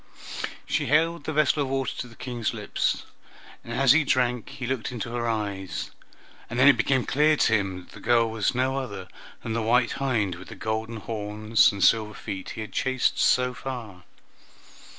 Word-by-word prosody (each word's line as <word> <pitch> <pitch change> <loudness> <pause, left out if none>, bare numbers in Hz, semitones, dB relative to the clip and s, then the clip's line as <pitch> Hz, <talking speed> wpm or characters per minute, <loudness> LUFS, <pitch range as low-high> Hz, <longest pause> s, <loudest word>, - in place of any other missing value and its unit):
She - - -1
held 160 +1 +2
the - - -2
vessel 155 0 +2
of 135 - -1
water 135 -1 -1
to 125 - -4
the 120 - -15
King's 120 -2 -3
lips, - - -1 0.6
and 115 - -9
as 135 +2 +4
he 160 +2 +5
drank 125 -4 0
he 125 - -6
looked 130 -1 -2
into 120 -1 -5
her 120 -1 -1
eyes, 100 -4 -3 0.6
and 115 - -4
then 130 +2 +6
it 145 - +8
became 125 +2 +1
clear 150 +2 +3
to 110 - +3
him 95 -3 0
that - - -19
the - - -12
girl 115 -1 +3
was 110 +1 0
no 130 +2 +1
other 100 -8 -6 0.4
than 115 - -3
the 115 - 0
white 120 +2 +3
hind 115 -9 +1
with 90 +2 -10
the - - -9
golden 110 +1 -3
horns 110 +1 +1
and 100 -2 -3
silver 110 -2 +3
feet 95 -1 -6
he - - -3
had 110 - -7
chased 130 -1 +1
so 125 0 +3
far. 115 -7 -7
120 Hz, 190 wpm, -26 LUFS, 110-130 Hz, 0.6 s, it